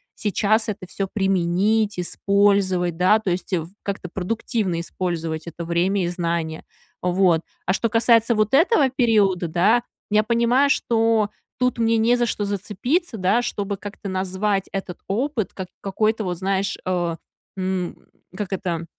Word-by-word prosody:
сейчас 215 +2 +1
это 190 -3 -5
всё 195 +1 -3
применить, 195 +2 +1
использовать, 190 -2 +2
да, 185 +5 +5
то 205 -5 -2
есть 180 +3 -3
в 165 -2 -1
как-то 195 -3 -4
продуктивно 195 -2 -2
использовать 165 -2 -3
это 170 0 -6
время 180 +3 +1
и - - -1
знания, 170 -2 -2 0.4
вот. 180 -2 +3 0.2
А 185 - +2
что 230 +3 0
касается 230 +1 +4
вот 215 +2 +1
этого 305 - +4
периода, 210 -8 +2
да, 200 +9 +3 0.3
я 215 - +5
понимаю, 235 +5 +3
что 225 -5 +2 0.3
тут 250 -1 +1
мне 230 0 +3
не 230 +2 +4
за 240 -1 +1
что 210 -2 -2
зацепиться, 220 - -2
да, 195 +6 +2
чтобы 205 -3 -3
как-то 205 +1 -8
назвать 190 +1 -1
этот 190 -3 -5
опыт 235 +2 -1
как 185 -2 -6
какой-то, 215 +2 0
вот 180 -2 -2
знаешь, 195 +1 -1
э, 175 -2 0 0.4
м, 185 -1 -2 0.4
как 205 -2 -3
это, 175 -4 -2
200 Hz, 150 wpm, -22 LUFS, 180-220 Hz, 0.4 s, да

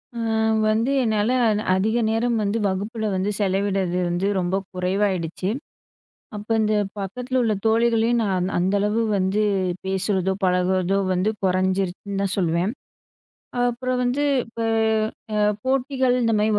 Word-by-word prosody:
அ - - -6 0.5
வந்து 225 +5 +1
என்னால 215 0 +1 0.2
அன 215 -1 +1
அதிக 220 +5 +1
நேரம் 230 +1 +1
வந்து 205 +2 0
வகுப்புல 210 +4 -3
வந்து 190 +2 0
செலவிடறது 195 -2 0
வந்து 175 +3 0
ரொம்ப 180 +1 0 0.2
குறைவாயிடுச்சு. 185 -1 -1 0.9
அப்ப 210 +2 -8
இந்த 215 0 +1 0.3
பக்கத்துல 250 +6 -2
உள்ள 220 -2 +2
தோழிகளையும், 230 +1 +3
நான் 185 -2 0
அந்த 185 +3 +1
அளவு 210 +3 +1
வந்து 195 +2 +1 0.4
பேசுறதோ, 190 0 0
பழகுறதோ 185 +1 +2 0.2
வந்து 185 +4 +1
குறைஞ்சிருச்சுன்னுதான் 190 +1 0
சொல்வேன். 175 +3 +1 1.0
அப்புறம் 255 +1 -2
வந்து, 255 +4 0 0.2
இப்ப 230 0 -12 0.8
அ - - +1 0.3
போட்டிகள் 260 -1 +1
இந்த 230 -1 +2
மாரி 215 +1 +2
205 Hz, 125 wpm, -23 LUFS, 185-230 Hz, 1.0 s, தோழிகளையும்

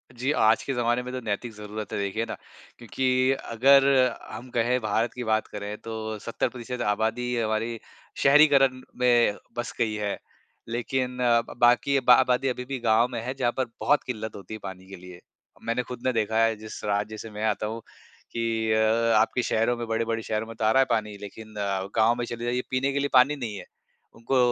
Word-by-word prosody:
जी, 130 +4 -1
आज 110 -7 +3
के 135 - -2
जमाने 120 0 +1
में 125 - -6
तो 130 - -3
नैतिक 115 +1 -3
ज़रूरत 105 0 -7
है - - -1
देखिए 100 +3 -2
ना, - - -5 0.4
क्योंकि 130 +2 +1 0.2
अगर 135 +4 +6 0.5
हम 125 - -8
कहें 120 +1 +1
भारत 110 +2 0
की 125 - -5
बात 110 -1 0
करें 105 0 -6
तो 110 -1 -5
70% 120 +2 -4
आबादी 115 +4 0
हमारी 115 +1 -1 0.4
शहरीकरण 140 -2 +5 0.2
में 120 -4 +3 0.2
बस 120 - -3
गई 110 -2 +1
है। 105 -1 -2 0.5
लेकिन 125 +2 -2
अ, 120 -2 +4
ब - - -12
बाकी 120 +3 +4
बा 125 -1 +6
आबादी 125 +2 +3
अभी 125 -1 -2
भी 135 0 -4
गाँव 115 0 +3
में 115 -2 -3
है 125 +3 -4
जहाँ 130 -3 0
पर 130 - +1 0.2
बहुत 145 - +3
किल्लत 110 -3 -5
होती 100 +1 -9
है 110 - -6
पानी 95 -1 -8
के 95 - -9
लिए। 90 -1 -12 0.5
मैंने 115 +2 0
खुद 125 -1 -8
ने 130 - +3
देखा 110 -1 0
है 115 0 +2
जिस 110 0 -9
राज्य 105 +1 -1
से 115 - -8
मैं 105 +1 -6
आता 105 -1 0
हूँ 115 +1 -5 0.5
कि 115 -1 -1
अ, 110 +1 +3
आपके 120 +2 0
शहरों 115 +2 +1
में 120 -1 -5
बड़े-बड़े 115 0 -1
शहरों 110 +1 -2
में 115 - -9
तो 110 - -2
आ 110 - +4
रहा 130 - +4
है - - +4
पानी 105 -3 -1
लेकिन 110 +2 -10
अ, 100 -2 -2
गाँव 115 +1 +4
में 120 0 -3
चले 120 0 -6
जाइए 125 +1 0
पीने 130 +2 +1
के 140 - 0
लिए 140 0 0
पानी 135 +3 +6
नहीं 120 -7 -5
है। - - -9 0.5
उनको 115 +4 -1
115 Hz, 210 wpm, -26 LUFS, 110-125 Hz, 0.5 s, अगर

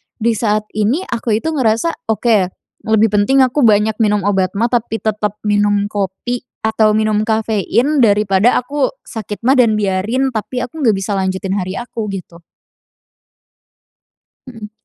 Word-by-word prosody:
di 235 0 0
saat 215 -1 0
ini 215 - 0
aku 235 - -2
itu 320 +9 -2
ngerasa 260 +2 -1
oke, 220 -3 +2 0.4
lebih 220 0 +3
penting 210 +6 +3
aku 255 +1 +2
banyak 215 0 +3
minum 210 -2 +2
obat 190 -2 0
maag 230 +4 0
tapi 225 -2 -6
tetap 210 -1 -1
minum 205 -1 +1
kopi 205 +5 -3 0.2
atau 220 -1 +2
minum 215 -1 +1
kafein, 225 +6 0
daripada 205 0 +3
aku 280 +2 -1 0.2
sakit 215 -2 -7
maag 265 +1 +4
dan 230 -3 +3
biarin, 210 +7 0
tapi 240 +3 -3
aku 285 +6 -11
nggak 225 -6 +3
bisa 195 +2 -3
lanjutin 190 0 -2
hari 185 0 -3
aku, 235 -2 -5
gitu. 175 -3 -9 2.1
Mhm. 225 -4 -10
215 Hz, 145 wpm, -16 LUFS, 205-240 Hz, 2.1 s, maag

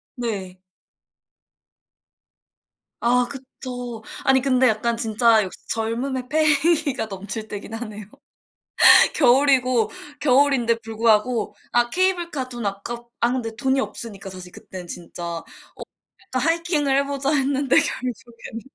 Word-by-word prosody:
네. 200 -7 -4 2.4
아 245 +1 +2
그쵸. 250 -3 -8 0.2
아니 265 0 +4
근데 260 -1 +3
약간 230 +1 +1
진짜 225 -1 +3
역시 185 - -7
젊음의 245 +3 -2
패기가 310 -2 +2
넘칠 205 +2 -6
때긴 210 +1 -7
하네요. 215 -2 -6 1.1
겨울이고 255 -3 +4 0.3
겨울인데 265 -4 +3
불구하고 225 +1 +1 0.2
아 240 0 +2
케이블카 345 -6 0
돈 240 -3 -5
아깝 235 +5 -5
아 235 +1 +2
근데 230 -3 -3
돈이 265 +2 +1
없으니까 200 -6 -7
사실 180 -1 -10
그때는, 185 -2 -10
진짜. 175 0 -9
어 170 -1 -5 0.9
약간 255 - +1
"하이킹을 330 -5 +1
해 280 - +2
보자." 280 0 -1
했는데 275 -1 +2
결국에는 235 -2 -3
245 Hz, 255 characters per minute, -22 LUFS, 220-270 Hz, 2.4 s, 아니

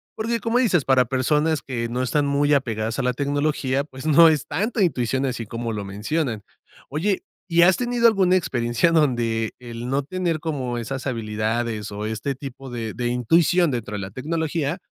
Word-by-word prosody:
porque, 230 +1 -1
como 230 +2 0
dices, 195 - +2
para 130 -2 +4
personas 150 +5 +1
que 115 -3 -3
no 125 +2 -2
están 145 +3 +1
muy 145 +1 +2
apegadas 115 -5 0
a - - 0
la 125 0 +1
tecnología, 140 0 0
pues, 130 -1 -11
no 165 +2 +8
es 155 -4 +1
tanta 210 +8 -1
intuición 130 -4 0
así 120 -3 -3
como 115 +2 -4
lo 105 -2 -4
mencionan. 110 +4 -2 0.5
Oye, 185 +7 0 0.3
¿y 170 0 +3
has 185 +1 +6
tenido 240 -1 +3
alguna 190 -4 +3
experiencia 120 +1 +1
donde 120 -8 +1
el 120 0 -7
no 135 +2 +1
tener 170 +1 -2
como 135 -6 -3
esas 130 +3 -5
habilidades 110 -2 -2
o 105 +1 -5
este 110 +5 -2
tipo 135 0 -9
de 115 -3 -4
de 120 -1 -2
intuición 165 +8 +3
dentro 115 -4 -4
de 105 - -3
la 95 0 -5
tecnología, 160 - -2
135 Hz, 180 wpm, -23 LUFS, 120-160 Hz, 0.5 s, no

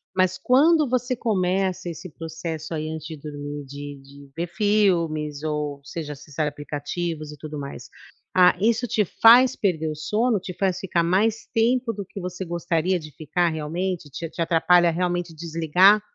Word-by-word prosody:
Mas 185 0 +2
quando 290 - +4
você 250 0 0
começa 185 -4 0
esse 170 +2 -8
processo 160 0 -6
aí 155 0 -3
antes 160 -1 -6
de 160 -2 -7
dormir, 145 0 -7
de 145 +1 -8
de 140 0 -15
ver 170 +1 -2
filmes, 170 -7 +1
ou 150 -2 -3
seja 150 -1 -5
acessar 150 +2 -4
aplicativos 150 +2 -4
e 150 - -11
tudo 150 0 -7
mais, 140 0 -8 0.5
ah, 180 -1 +6
isso 235 +3 +2
te 215 -2 +1 0.2
faz 245 +3 +8
perder 160 -6 0
o 155 - -4
sono? 215 +8 +1
Te 180 -1 -8
faz 190 -2 0
ficar 175 -3 0
mais 210 +6 +1
tempo 235 +1 +2
do 200 0 -5
que 195 - -9
você 180 +1 -5
gostaria 170 +1 0
de 155 -1 -10
ficar 170 +4 0
realmente? 160 +1 -3
Te 165 +4 -6
te 170 - -5
atrapalha 170 +1 +4
realmente 175 0 -1
desligar 170 +5 +4
170 Hz, 165 wpm, -24 LUFS, 155-195 Hz, 0.5 s, faz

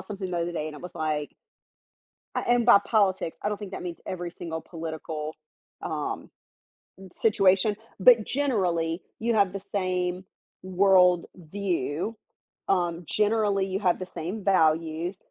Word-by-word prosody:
something 195 -3 -6
the 175 - -2
other 170 +1 -1
day 160 -3 -3
and 155 - -6
it 150 - -10
was 180 - -9
like 155 -3 -2 1.0
A - - +2
and 240 -1 +3
by 235 -4 +8
politics, 190 -6 +1
I 205 - +1
don't 210 - -2
think 205 -2 -8
that - - -6
means 175 -2 -6
every 175 -2 -4
single 160 -2 -6
political, 160 -2 -6 0.5
um, - - -4 0.7
m 190 - -11
situation, 200 -1 +3 0.2
but 230 +2 +7
generally 180 - 0 0.2
you 235 +1 +1
have 200 -2 +3
the 195 - -3
same 185 -1 -1 0.4
world 185 -2 +4
view. 180 - -3 0.5
Um, 175 -2 0
generally 210 -2 +2
you 190 0 -2
have 185 -4 +2
the 185 - -4
same 185 +5 -5
values. 165 -1 +2
185 Hz, 150 wpm, -27 LUFS, 170-200 Hz, 1.0 s, by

